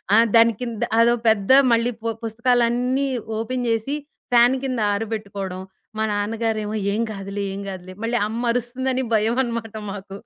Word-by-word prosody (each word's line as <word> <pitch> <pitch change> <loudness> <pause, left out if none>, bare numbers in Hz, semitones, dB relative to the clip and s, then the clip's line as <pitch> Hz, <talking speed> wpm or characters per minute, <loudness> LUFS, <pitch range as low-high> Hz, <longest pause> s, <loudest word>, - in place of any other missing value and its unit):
ఆ! - - +7 0.2
దాని 230 0 +6
కింద 235 -1 -3 0.2
అదో 235 +1 +5
పెద్ద 215 +1 +3 0.2
మళ్ళీ 230 +1 +3
పు 230 - -2
పుస్తకాలన్నీ 245 +3 +1 0.3
ఓపెన్ 250 +3 -2
జేసి 230 +5 0 0.4
ఫ్యాను 245 +2 +5
కింద 255 -3 -2
ఆరబెట్టుకోడం. 200 -3 -4 0.4
మా 220 - 0
నాన్నగారేమో 215 +1 -1 0.2
"ఏం 215 - -1
గాదులే, 200 0 -5
ఏం 200 - -5
గాదులే." 185 -1 -8
మళ్ళీ 240 +1 0
అమ్మ 230 +2 -4
అరుస్తుందని 255 +2 -1
భయమనమాట 230 0 0 0.2
మాకు. 195 -1 -8
230 Hz, 140 wpm, -22 LUFS, 210-245 Hz, 0.4 s, ఆ